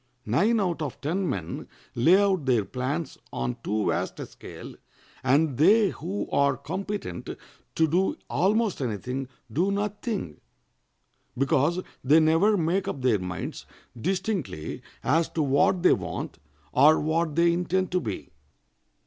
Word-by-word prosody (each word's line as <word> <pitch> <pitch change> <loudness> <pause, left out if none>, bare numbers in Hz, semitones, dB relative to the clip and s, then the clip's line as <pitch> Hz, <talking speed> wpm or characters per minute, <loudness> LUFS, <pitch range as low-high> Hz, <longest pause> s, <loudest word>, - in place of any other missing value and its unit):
Nine 200 - +2
out 175 -5 -1
of 145 -5 -4
ten 175 +5 -1
men 95 -10 -4 0.3
lay 165 +11 +5
out 190 -8 +1
their 120 -6 +3
plans 135 - -3
on 65 -1 -3
too 105 0 0
vast - - -2
a - - -4
scale, - - -10 0.5
and 140 +1 +2
they 205 +5 +5
who 190 +6 -4
are 140 -1 +3
competent 185 - -5 0.5
to 160 - +3
do 185 - +1
almost 210 -1 +1
any 115 -5 -1
thing 130 +5 -4 0.3
do 180 +7 +2
nothing, 205 - -3 1.0
because 145 +6 +2 0.2
they 150 +5 +6
never 165 +7 +4
make 175 +3 0
up 135 - -4
their 120 -5 +3
minds 90 0 -5 0.3
distinctly 180 - -3 0.2
as 160 +7 +2
to 160 - -1
what 145 +6 +2
they - - +7
want - - -4 0.3
or 150 - +6
what 160 0 0
they 170 0 +4
intend 180 +2 0
to 180 - +2
be. 105 - -5
160 Hz, 140 wpm, -26 LUFS, 130-190 Hz, 1.0 s, they